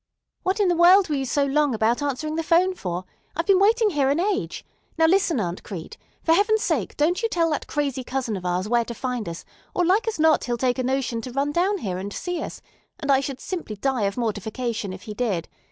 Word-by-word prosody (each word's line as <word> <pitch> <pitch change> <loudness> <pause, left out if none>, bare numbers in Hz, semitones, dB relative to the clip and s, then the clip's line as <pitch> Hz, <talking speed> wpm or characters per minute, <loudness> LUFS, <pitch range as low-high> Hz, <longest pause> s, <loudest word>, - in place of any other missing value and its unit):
"What 375 +3 0
in 405 - +3
the 350 - +3
world 360 +2 +6
were 300 - +1
you 270 -1 -1
so 280 +2 +1
long 285 -2 +2
about 225 +4 +1
answering 290 +2 -2
the 330 - 0
'phone 350 +3 +3
for? 180 - -4 0.3
I've 335 - -1
been 390 -1 +5
waiting 435 +2 +4
here 280 -4 +2
an 285 +4 +2
age. 400 +2 -1 0.3
Now, 325 - +5
listen, 345 -4 +3
Aunt 175 -3 -3
Crete. 175 -6 -8 0.3
For 325 - +4
heaven's 420 +4 +3
sake - - -1
don't 330 +7 +2
you 455 - 0
tell 335 -5 +1
that 300 - -2
crazy 275 -3 -2
cousin 250 -3 -2
of 185 - -6
ours 180 +2 -1
where 235 +1 +2
to 235 - -6
find 250 -6 -3
us, 165 - -8 0.3
or 355 - +2
like 400 +7 +2
as 450 - -1
not 315 0 +4
he'll 240 -1 -1
take 250 +1 0
a - - +1
notion 255 -3 -1
to 255 - -7
run 275 +3 0
down 370 +6 +1
here 185 - -3
and 200 +2 -5
see 355 - -3
us; - - -7 0.4
and 280 - 0
I 270 - +5
should 275 -1 -4
simply 340 - -5
die 250 0 0
of 200 +3 -2
mortification 220 -1 -2
if 185 0 -9
he 215 - -6
did. 205 -8 -1
275 Hz, 240 wpm, -24 LUFS, 230-345 Hz, 0.4 s, world